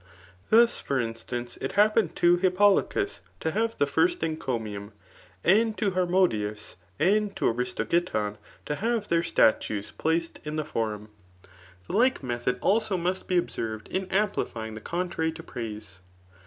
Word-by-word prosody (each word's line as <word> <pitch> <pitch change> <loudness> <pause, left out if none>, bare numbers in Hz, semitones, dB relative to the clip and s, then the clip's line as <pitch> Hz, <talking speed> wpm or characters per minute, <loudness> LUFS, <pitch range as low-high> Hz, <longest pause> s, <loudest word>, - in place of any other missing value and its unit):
Thoa^ 230 +2 +8
finr 135 - -2
iMtxoctf 120 +1 -6
k 135 - -4
happened 210 -2 +3
to 175 0 +5
Hippolochus 200 - +2 0.2
to 160 - -1
have 225 +5 -1
the 145 - +3
first 350 - +1
eacomiuiDy 110 -10 -3 0.5
and 215 +4 +3
to 205 -2 +1
Hbor 180 -1 0
modiusy 105 - 0 0.2
and 200 +5 +2
to - - -2
Aristogiton 125 - 0 0.3
to 150 - -2
have 225 -1 -1
their 170 0 +3
statues 110 -8 +2
placed 165 +1 -1
in 150 -1 -4
the 155 -1 -2
forum. 110 -6 -3 0.8
The - - -7
like 245 - +3
method 120 0 -1
also 205 -1 +2
must 180 +2 -2
be 180 - +2
observed 110 -10 -3
in 190 0 -1
amplifying 185 - -1
the 110 - -8
contrary 170 0 -2
to 165 0 -10
praise. 105 - -7
165 Hz, 145 wpm, -27 LUFS, -, 0.8 s, Thoa^